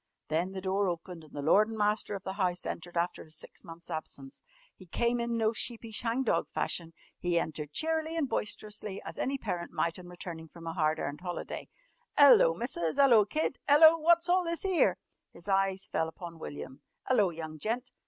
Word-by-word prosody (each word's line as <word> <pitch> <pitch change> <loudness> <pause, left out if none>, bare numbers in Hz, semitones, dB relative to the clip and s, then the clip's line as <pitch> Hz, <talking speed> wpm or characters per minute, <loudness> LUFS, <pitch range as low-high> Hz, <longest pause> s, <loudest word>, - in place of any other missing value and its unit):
Then 170 +5 0
the 190 - -5
door 195 +1 +1
opened, 170 -1 -5
and 155 - -16
the 145 - -4
lord 210 +8 +5
and 225 - -5
master 210 0 +1
of 195 - -7
the 190 - -4
house 180 -3 -1
entered 175 +1 -5
after 175 +1 -1
his 155 0 -6
six - - -6
months' 165 +1 -11
absence. 140 -3 -6 0.3
He 185 - -15
came 235 +7 0
in 235 0 -1
no 220 0 +2
sheepish 230 -1 -2
hang 235 +3 0
dog 240 - +1
fashion. 165 -1 -2 0.3
He 175 -1 +1
entered 150 -2 -4
cheerily 320 - -1
and 305 -4 +1
boisterously 210 -3 -3
as - - -8
any 275 +1 0
parent 180 -8 -4
might 170 +1 -1
on 180 - -11
returning 170 -2 -7
from 165 +1 -13
a 165 - -3
hard 155 -2 +1
earned 145 +3 -4
holiday. 175 -1 -5 0.5
"'Ello, 265 - +8
Missus! 170 -7 -2
'Ello, 240 -7 +6
Kid! 305 +5 -1
'Ello! 315 +3 +9
Wot's 340 +2 +4
all 365 +1 +4
this 335 +2 -2
'ere?" 375 -3 +3 0.4
His 170 +3 -10
eyes 195 -1 +1
fell 160 - +1
upon 165 0 -9
William. 75 - -8 0.3
"'Ello 215 -7 +4
young 160 -2 -7
gent!" 235 - -2
190 Hz, 195 wpm, -30 LUFS, 165-235 Hz, 0.5 s, Ello